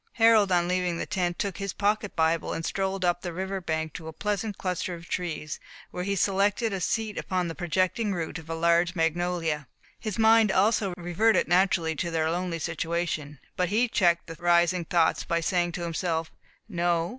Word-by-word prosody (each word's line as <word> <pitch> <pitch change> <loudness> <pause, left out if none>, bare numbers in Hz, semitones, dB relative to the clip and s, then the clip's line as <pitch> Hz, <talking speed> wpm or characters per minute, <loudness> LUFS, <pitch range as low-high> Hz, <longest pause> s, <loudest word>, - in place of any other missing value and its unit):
Harold, 225 -4 +5
on 175 -1 +3
leaving 180 -1 0
the - - -3
tent, 180 -4 -1
took 200 -3 -2
his 195 -1 -3
pocket 205 0 0
Bible 160 0 +1
and 165 - -4
strolled 195 -1 -1
up 175 0 +1
the 175 - -4
river 190 +2 -3
bank, 160 -2 -2
to 160 -2 -8
a - - -5
pleasant 210 +3 -2
cluster 180 -1 -2
of 170 0 -12
trees, 160 -4 -4 0.3
where 180 - -4
he 200 +1 -1
selected 200 +3 +1
a 190 - -3
seat 220 +3 -1
upon 185 -2 -1
the 165 - -4
projecting 185 +5 0
root 170 -3 -3
of 160 0 -14
a 165 - -2
large 170 +1 +2
magnolia. 165 -3 0 0.3
His 215 -4 -4
mind 225 -2 +5
also 200 -1 +2
reverted 175 +6 +2
naturally 175 -2 +2
to 170 - -1
their 160 -1 0
lonely 175 0 -2
situation; 165 -3 -3 0.2
but 180 -1 0
he 225 +5 +2
checked 175 -6 +2
the 165 - -7
rising 175 0 +3
thoughts, 165 0 +2
by 170 - 0
saying 175 0 0
to 175 - -4
himself, 165 -1 -2 0.4
"No. 175 -3 0
175 Hz, 190 wpm, -27 LUFS, 165-195 Hz, 0.4 s, Harold